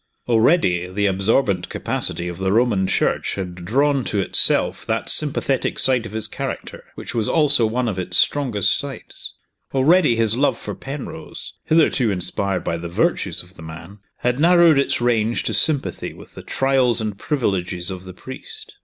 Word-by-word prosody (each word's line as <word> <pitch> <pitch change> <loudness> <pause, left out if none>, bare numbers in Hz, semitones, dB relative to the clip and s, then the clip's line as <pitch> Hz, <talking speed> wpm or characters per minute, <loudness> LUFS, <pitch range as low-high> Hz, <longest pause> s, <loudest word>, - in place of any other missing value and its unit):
Already, 110 - +3
the 100 +2 -1
absorbent 100 0 +1
capacity 85 - -2
of 85 0 -6
the 95 0 0
Roman 105 -4 +2
Church - - 0
had 95 -2 -5
drawn 135 +10 0
to 105 - -1
itself 95 - +2
that - - -1
sympathetic - - +2
side 125 -3 +1
of - - -11
his 110 0 -3
character - - -6
which - - -7
was 115 -3 -1
also 145 -7 +4
one 120 +3 -1
of 95 -4 -3
its 90 0 0
strongest 125 -9 +2
sides. - - -6 0.4
Already, 145 0 +4
his 115 -1 +2
love 140 +3 +1
for - - -6
Penrose 135 +1 -8
hitherto 155 -7 +3
inspired 95 0 -2
by 85 - -2
the 85 +1 -6
virtues 85 - -1
of 90 +1 -18
the 80 - -14
man 80 +5 -10 0.2
had 125 +2 -1
narrowed 170 -2 +5
its 140 - 0
range 115 -1 +1
to - - -2
sympathy 135 - 0
with - - -15
the - - -9
trials 130 -3 +1
and 105 -2 -3
privileges 95 - -2
of 95 -1 -7
the 95 - -9
priest. 435 - -8
110 Hz, 170 wpm, -21 LUFS, 95-135 Hz, 0.4 s, narrowed